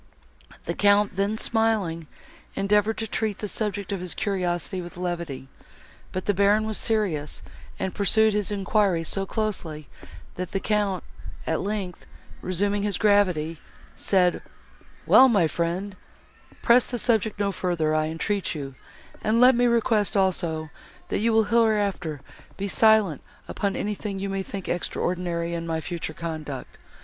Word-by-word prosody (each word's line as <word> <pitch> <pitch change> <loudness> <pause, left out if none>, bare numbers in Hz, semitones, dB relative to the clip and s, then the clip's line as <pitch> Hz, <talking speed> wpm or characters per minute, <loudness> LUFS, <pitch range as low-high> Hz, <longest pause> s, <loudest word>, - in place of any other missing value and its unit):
The - - -1
Count, 205 -1 +3
then 200 +3 0
smiling, 215 -9 0 0.5
endeavoured 210 +2 +2
to 225 - -3
treat 215 -1 -2
the 210 - -4
subject 205 -2 -3
of 195 - -2
his 180 -1 -5
curiosity 185 -1 -2
with 175 0 -10
levity, 170 -7 -4 0.6
but 185 - -4
the 205 - +2
Baron 205 +2 +3
was 220 -1 -1
serious, 185 -10 -1 0.3
and 190 - -3
pursued 220 +2 +3
his 210 -1 -1
enquiries 195 -4 +1
so 195 -1 -1
closely, 175 - -3 0.5
that 185 0 -5
the 195 - +1
Count, 205 -3 0 0.4
at 160 - 0
length, 195 -3 -4 0.3
resuming 200 +3 0
his 205 -2 -1
gravity, 180 -7 +2 0.4
said, 180 -2 +2 0.6
"Well, 265 0 +8
my 200 -8 +4
friend, 175 +5 -2 0.7
press 240 0 +5
the 245 - -3
subject 220 -3 +1
no 200 -1 +1
further, 170 -5 -1
I 155 0 +1
entreat 170 +3 -2
you; 140 -3 -6 0.5
and 220 +2 +2
let 250 +2 +8
me 245 0 +3
request 225 -3 +2
also, 165 -5 0 0.4
that - - 0
you 230 +2 +2
will 220 0 +4
hereafter 205 - +1 0.4
be 200 - -2
silent 215 -6 +4 0.3
upon 200 -1 -2
anything 210 -1 -3
you 195 +1 -3
may 195 0 -2
think 195 -1 -7
extraordinary 175 -1 -2
in 170 0 -4
my 160 -1 -1
future 160 -1 -5
conduct. 155 -5 -6
195 Hz, 145 wpm, -25 LUFS, 170-210 Hz, 0.7 s, Well